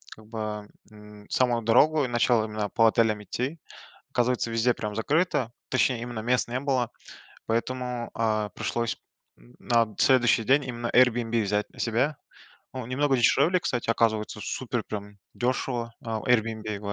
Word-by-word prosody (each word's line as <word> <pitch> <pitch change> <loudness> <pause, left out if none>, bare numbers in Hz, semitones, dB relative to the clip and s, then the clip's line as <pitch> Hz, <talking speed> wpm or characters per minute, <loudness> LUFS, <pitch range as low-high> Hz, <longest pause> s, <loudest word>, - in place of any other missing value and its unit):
как 110 - -16
бы, 110 -2 -5 0.2
м, 105 -1 -14
в - - -8
самую 120 -2 +2
дорогу, 145 +7 +4
и - - -2
начал 120 -1 +2
именно 105 -1 -3
по 115 -2 +4
отелям 110 -1 +2
идти. 130 +9 -4 0.5
Оказывается, 125 -1 +1
везде 115 +2 +2
прям 105 -2 -5
закрыто, 145 - +1 0.2
точнее, 130 -2 +1
именно 120 -1 -5
мест 125 +3 +1
не 125 +1 -1
было, 130 -4 0 0.6
поэтому, 125 +1 -2
а, 110 -2 0
пришлось 115 +2 -2 0.4
на 110 - -1
следующий 120 -3 +4
день 135 +4 +3
именно 120 -1 -4
Airbnb 120 -2 +3
взять 105 +1 -1
на - - -19
себя. 125 +6 +1 0.6
Ну, 130 -2 -5
немного 135 +2 +1
дешевле, 140 +9 +4
кстати, 125 -8 -2
оказывается, 110 -3 +1
супер - - -3
прям 105 -1 -7 0.2
дешево, 120 -1 -2
а, 115 -1 -3
Airbnb 110 -3 0
115 Hz, 150 wpm, -26 LUFS, 110-125 Hz, 0.6 s, дорогу